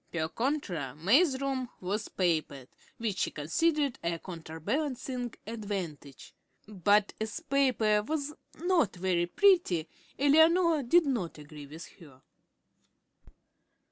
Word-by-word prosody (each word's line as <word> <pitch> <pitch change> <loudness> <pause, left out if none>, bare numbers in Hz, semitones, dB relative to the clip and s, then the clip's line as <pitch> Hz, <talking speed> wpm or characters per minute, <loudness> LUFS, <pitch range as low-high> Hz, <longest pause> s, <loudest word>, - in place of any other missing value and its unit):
Per 160 -2 -2
contra 180 - -2
May's 260 - +3
room 265 -2 -2
was 205 +4 -3
papered, 155 -7 -1 0.3
which 215 -5 -2
she - - +1
considered 285 - 0
a 170 0 -1
counterbalancing 245 - -4
advantage; 190 - -6 0.3
but 205 0 +2
as 220 -1 -3
the 330 - -6
paper 255 -8 +2
was 295 +5 -3 0.2
not 335 - +1
very 175 -1 0
pretty, 335 - +3 0.3
Eleanor 320 +3 +4
did 325 +7 +4
not 230 - -2
agree 150 -1 -11
with 155 +4 -9
her. 145 -7 -15
215 Hz, 110 wpm, -30 LUFS, 170-280 Hz, 0.3 s, Eleanor